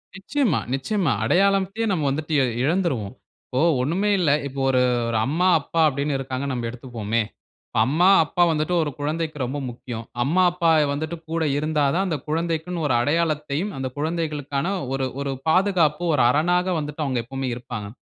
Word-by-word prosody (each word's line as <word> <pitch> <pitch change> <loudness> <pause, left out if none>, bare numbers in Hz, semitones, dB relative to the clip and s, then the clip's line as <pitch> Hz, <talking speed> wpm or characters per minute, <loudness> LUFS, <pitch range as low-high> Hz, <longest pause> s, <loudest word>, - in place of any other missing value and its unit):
நிச்சயமா 240 +5 0
நிச்சயமா, 165 +4 0
அடையாளம்த்தையே 195 - +2
நம்ப 165 -6 0
வந்துட்டு 155 +3 -3
இ - - +4 0.2
இழந்துருவோம், 145 - 0 0.3
இப்போ 130 - -3 0.2
ஒண்ணுமே 175 +10 0
இல்ல, 165 -6 +3 0.2
இப்போ 140 0 -7
ஒரு 130 -1 +3 0.3
ஒரு 115 - 0
அம்மா, 165 +7 +1
அப்பா 165 +3 -1
அப்டினு 140 0 -1
இருக்கிறாங்கனு 135 +1 -3
நம்ப 120 -1 -3
எடுத்துக்குவோமே, 115 -2 -3 0.5
இப்போ - - -1
அம்மா, 160 +7 +3 0.2
அப்பா 175 +3 +1
வந்துட்டு 155 +2 -1
ஒரு 150 - -3
குழந்தைக்கு 155 +1 -2
ரொம்ப 135 +4 -4
முக்கியம், 120 -1 -7 0.2
அம்மா, 170 +8 +2
அப்பா 170 -2 +2 0.2
வந்துட்டு 155 +4 -4
கூட 165 0 0
இருந்தா 150 -1 +1
தான் 190 +2 +1
அந்த 160 -4 -1
குழந்தைக்குனு 165 +1 -2
ஒரு 130 - +2
அடையாளத்தையும், 155 +4 0
அந்த 130 -1 -3
குழந்தைகளுக்கான 150 0 -2 0.2
ஒரு 135 -1 -1
ஒரு 140 -1 -2 0.2
பாதுகாப்பு 175 -4 +2
ஒரு 130 - +3
அரணாக 175 +6 +2
வந்துட்டு 150 +1 -4
அவங்க 130 -3 -1
எப்பவுமே 135 +1 -4
இருப்பாங்க, 120 -4 -6
150 Hz, 160 wpm, -23 LUFS, 135-170 Hz, 0.5 s, இ